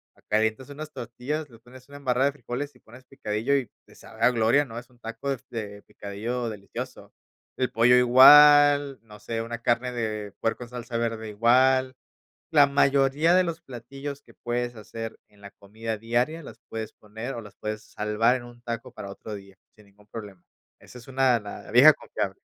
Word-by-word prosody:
Ah, -, -, -26 dB
calientas 110 Hz, +5 st, 0 dB
unas 155 Hz, +2 st, -8 dB
tortillas, 140 Hz, +6 st, -5 dB
le 115 Hz, -, -16 dB
pones 125 Hz, +2 st, -16 dB
una 145 Hz, -, -10 dB
embarrada 130 Hz, -1 st, +1 dB
de -, -, 0 dB
frijoles 140 Hz, +1 st, -6 dB
y -, -, -21 dB
pones 130 Hz, +3 st, -16 dB
picadillo 125 Hz, 0 st, -2 dB
y 130 Hz, -6 st, -3 dB, 0.2 s
te -, -, -19 dB
sabe 110 Hz, -, -14 dB
a 115 Hz, -, +6 dB
gloria. 120 Hz, +4 st, +3 dB
No 115 Hz, -3 st, -10 dB
es 120 Hz, 0 st, -8 dB
un 120 Hz, -, -25 dB
taco 115 Hz, +4 st, -6 dB
de 135 Hz, -, -3 dB
de 105 Hz, -3 st, -6 dB
picadillo 115 Hz, +6 st, -5 dB
delicioso. 100 Hz, -2 st, -8 dB, 0.5 s
El 130 Hz, -2 st, -1 dB
pollo 120 Hz, +1 st, +5 dB
igual, 145 Hz, +2 st, +7 dB
no 105 Hz, -2 st, -15 dB
sé, 115 Hz, +1 st, -4 dB
una 115 Hz, +1 st, -5 dB
carne 120 Hz, +1 st, +1 dB
de 110 Hz, -3 st, -3 dB
puerco 115 Hz, +2 st, -2 dB
en 120 Hz, -, -12 dB
salsa 120 Hz, -1 st, -7 dB
verde 115 Hz, -1 st, -3 dB
igual. 130 Hz, +4 st, +3 dB, 0.6 s
La 145 Hz, -3 st, +6 dB
mayoría 140 Hz, +3 st, +3 dB
de 185 Hz, 0 st, +4 dB
los 170 Hz, -1 st, -4 dB
platillos 135 Hz, +3 st, -8 dB
que -, -, -20 dB
puedes 120 Hz, 0 st, -3 dB
hacer 115 Hz, +1 st, -8 dB
en 105 Hz, -, -25 dB
la 100 Hz, 0 st, -11 dB
comida 110 Hz, +2 st, -6 dB
diaria 120 Hz, +9 st, -1 dB
las -, -, -12 dB
puedes 110 Hz, -1 st, -6 dB
poner 110 Hz, +5 st, -8 dB
o 115 Hz, -, -5 dB
las 105 Hz, -2 st, -14 dB
puedes 110 Hz, 0 st, -5 dB
salvar 105 Hz, +3 st, +1 dB
en 125 Hz, -, -7 dB
un 120 Hz, 0 st, -14 dB
taco 115 Hz, +1 st, -5 dB
para 100 Hz, -5 st, -9 dB
otro 105 Hz, +2 st, -8 dB
día, 100 Hz, -1 st, -11 dB, 0.2 s
sin 105 Hz, -1 st, -20 dB
ningún 100 Hz, +1 st, -24 dB
problema. 100 Hz, -5 st, -9 dB, 0.4 s
Esa 125 Hz, -, -13 dB
es 120 Hz, -, -15 dB
una 130 Hz, -2 st, +2 dB
La 105 Hz, 0 st, -9 dB
vieja 135 Hz, +6 st, +9 dB
confiable. -, -, -5 dB
120 Hz, 195 wpm, -26 LUFS, 110-135 Hz, 0.6 s, vieja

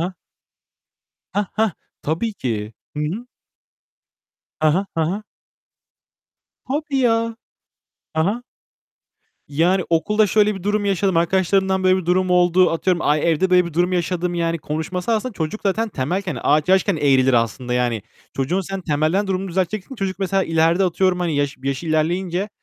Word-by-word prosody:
ha. 180 Hz, +3 st, -2 dB, 1.2 s
Hah, 205 Hz, 0 st, +1 dB
hah. 220 Hz, -2 st, +2 dB, 0.3 s
Tabii 170 Hz, +9 st, -1 dB
ki. 110 Hz, -, -3 dB, 0.2 s
Hı -, -, -2 dB
hı. 200 Hz, +11 st, -3 dB, 1.3 s
Ha 155 Hz, 0 st, +4 dB
ha. 185 Hz, +6 st, +1 dB
Ha 165 Hz, -, +1 dB
ha. 200 Hz, +3 st, -3 dB, 1.5 s
Tabii 285 Hz, 0 st, -1 dB
ya. 230 Hz, -1 st, +1 dB, 0.8 s
Ha 160 Hz, 0 st, +2 dB
ha. 215 Hz, +6 st, -1 dB, 1.1 s
Yani 175 Hz, +5 st, +2 dB
"Okulda 210 Hz, +6 st, +3 dB
şöyle 210 Hz, +1 st, +3 dB
bir 190 Hz, -, -8 dB
durum 205 Hz, +1 st, 0 dB
yaşadım. 195 Hz, -2 st, +1 dB
Arkadaşlarımdan 190 Hz, +2 st, +2 dB
böyle 185 Hz, 0 st, +5 dB
bir 185 Hz, -3 st, -4 dB
durum 185 Hz, +1 st, +2 dB
oldu." 180 Hz, 0 st, +4 dB
Atıyorum, 175 Hz, +1 st, 0 dB
"Ay 150 Hz, +3 st, +2 dB
evde 180 Hz, +4 st, +1 dB
böyle 180 Hz, 0 st, +5 dB
bir 170 Hz, -, -7 dB
durum 175 Hz, +2 st, +1 dB
yaşadım." 180 Hz, 0 st, -1 dB
Yani 170 Hz, -1 st, 0 dB
konuşması 160 Hz, +8 st, -3 dB
aslında 230 Hz, +3 st, -1 dB
çocuk 170 Hz, +2 st, -4 dB
zaten 220 Hz, +3 st, 0 dB
temelken, 180 Hz, +3 st, -2 dB
ağaç 150 Hz, +3 st, +2 dB
yaşken 190 Hz, 0 st, +3 dB
eğrilir 135 Hz, -3 st, +3 dB
aslında 120 Hz, +1 st, 0 dB
yani. 120 Hz, -3 st, 0 dB, 0.3 s
Çocuğun 140 Hz, +8 st, 0 dB
sen 195 Hz, 0 st, -5 dB
temelden 160 Hz, +4 st, 0 dB
durumunu 190 Hz, 0 st, -2 dB
düzelteceksin, 190 Hz, +6 st, -2 dB
çocuk 195 Hz, -5 st, -3 dB
mesela 195 Hz, 0 st, +1 dB
ileride 165 Hz, +3 st, +2 dB
atıyorum 185 Hz, 0 st, +1 dB
hani 170 Hz, -4 st, 0 dB
yaş 145 Hz, -1 st, 0 dB
yaşı 135 Hz, +4 st, -3 dB
ilerleyince 175 Hz, +5 st, 0 dB
180 Hz, 150 wpm, -21 LUFS, 160-195 Hz, 1.5 s, böyle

